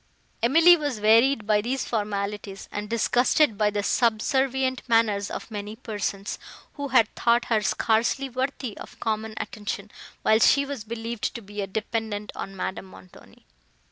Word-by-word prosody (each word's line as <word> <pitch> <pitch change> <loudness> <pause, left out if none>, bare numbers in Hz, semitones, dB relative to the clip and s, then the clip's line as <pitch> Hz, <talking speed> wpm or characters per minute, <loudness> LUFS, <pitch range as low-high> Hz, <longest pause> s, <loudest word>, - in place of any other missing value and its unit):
Emily 325 +9 +7
was 290 -8 -3
wearied 225 +3 +4
by 210 -1 +3
these 255 +4 -2
formalities, 205 -2 -3
and 205 0 -5
disgusted 240 +3 +3
by 210 0 +2
the 205 0 -2
subservient 260 +4 +1
manners 215 -3 +2
of - - -7
many 210 0 -5
persons, 205 -4 -4 0.3
who 285 -1 -4
had 245 -4 +4
thought 235 0 +2
her 220 -2 +1
scarcely 230 +6 +1
worthy 255 -3 -3
of - - -11
common 220 -1 -2
attention, 210 -2 -5 0.3
while 220 0 +4
she 280 +4 +5
was 275 -5 -5
believed 225 0 -4
to 235 - -5
be 205 +1 -6
a 195 - -3
dependant 215 0 -3
on 195 - -6
Madame 190 0 -4
Montoni. 185 -1 -17
220 Hz, 150 wpm, -25 LUFS, 210-250 Hz, 0.3 s, Emily